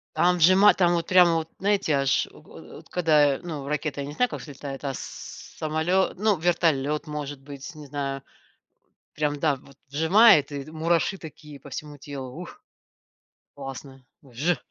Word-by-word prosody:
Там 180 0 +3
вжимает, 185 +5 +6
там 175 -2 +3
вот 170 -1 -1
прямо, 180 -2 +6
вот 160 0 -2
знаете, 195 -5 +1
аж 135 -1 +1
от - - -18
от - - -13
когда 150 -5 +3
ну 150 -5 -6
ракета, 150 -1 -2
я 140 - -5
не 145 - -7
знаю 250 +10 +1
как - - -6
взлетает, 140 -1 -8
а 135 -1 -2
с - - -6 0.6
самолет, 160 +5 +1
ну 210 0 +2
вертолет 155 -3 +1
может 145 -2 -5
быть, 140 +3 -10
не 150 -1 -10
знаю, 135 -1 -4 0.9
прям, 145 -1 -1
да, 145 -3 +2
вот 135 +1 -18
вжимает 160 - +5
и 140 +1 -6
мураши 170 +4 0
такие 150 -3 -11
по 140 - -13
всему 150 +1 -7
телу. 135 -2 -8
Ух! - - -12 0.9
Классно 135 -1 -9 0.2
вж! 140 +6 -1
150 Hz, 165 wpm, -25 LUFS, 140-170 Hz, 0.9 s, вжимает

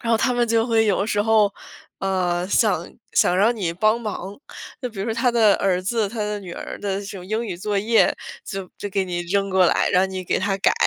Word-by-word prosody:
然 230 - -2
后 225 - +5
他 250 +2 +1
们 240 -1 +1
就 230 +1 +2
会 225 -2 +3
有 200 0 +1
时 205 -1 +1
候， 215 -2 +3 0.5
呃， 180 -2 0
想 195 -6 +2 0.3
想 180 - +3
让 220 +5 +3
你 180 -6 -2
帮 215 +6 +2
忙。 205 -3 -5 0.4
就 250 - -3
比 205 - -12
如 195 - -2
说 225 - -2
他 245 +2 +2
的 225 -4 +4
儿 185 -2 +1
子、 210 +2 0
他 225 +2 -8
的 210 -1 -2
女 180 -3 -8
儿 - - -7
的 195 -1 -2
这 200 - -8
种 180 - -9
英 220 +4 -2
语 180 -4 -4
作 205 +2 -1
业， 225 +2 +3 0.3
就 195 -3 -6
就 205 - -5
给 195 -1 0
你 175 -1 -3
扔 195 +3 0
过 185 -2 +4
来， - - +2
让 185 +1 +3
你 185 -1 -5
给 - - 0
他 195 0 0
改。 - - +3
200 Hz, 260 characters per minute, -22 LUFS, 185-225 Hz, 0.5 s, 后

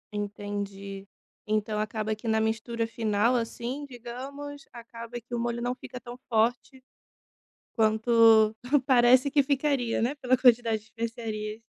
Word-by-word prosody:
Entendi, 200 -1 -5 0.4
então 215 0 0
acaba 215 0 -2
que 215 +2 -9
na 220 0 +2
mistura 225 +1 -1
final, 225 +1 +1
assim, 240 +4 -3
digamos, 275 +4 -8
acaba 235 0 -8
que 240 +1 -14
o 240 - -1
molho 235 0 -2
não 245 +1 -1
fica 250 0 -9
tão 240 -1 -9
forte 240 +3 0 0.9
quanto 220 0 +5 0.3
parece 255 +1 +5
que 285 -1 +3
ficaria 275 -4 0
né 255 +5 0
pela 255 -2 +2
quantidade 240 -3 +4
de - - -22
especiarias. 225 -1 -5
230 Hz, 135 wpm, -27 LUFS, 220-250 Hz, 0.9 s, quanto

